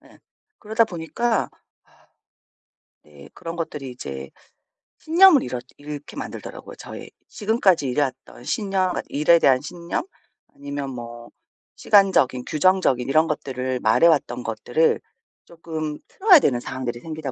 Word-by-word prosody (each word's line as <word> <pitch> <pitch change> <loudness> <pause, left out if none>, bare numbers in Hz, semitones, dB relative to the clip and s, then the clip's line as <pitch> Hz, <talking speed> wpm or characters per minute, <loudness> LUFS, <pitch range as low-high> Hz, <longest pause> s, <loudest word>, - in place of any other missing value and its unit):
네. - - -20 0.4
그러다 220 +1 +1
보니까 220 +5 -2 1.5
네. 70 -2 -16
그런 165 0 -7
것들이 150 -5 -5
이제 70 - -8 0.7
신념을 335 -3 +6
잃었 125 -1 -5
잃게 145 0 -9
만들더라고요 - - -8
저의. - - -10 0.2
지금까지 205 - +1
일해왔던 130 -2 -3
신념 195 - 0
그러니까 - - -3
일에 155 +4 +4
대한 130 -5 +4
신념 170 - -4 0.5
아니면 140 -1 -5
뭐 120 -1 -9 0.5
시간적인 190 -11 +3
규정적인 155 -7 +2
이런 155 +3 +3
것들을 130 -4 -3
말해왔던 145 -7 +3
것들을 120 +7 0 0.4
쪼끔 160 -3 -6
틀어야 380 -4 +6
되는 125 - +1
상황들이 120 -1 -5
생기다 155 -3 -6
150 Hz, 305 characters per minute, -23 LUFS, 125-185 Hz, 1.5 s, 신념을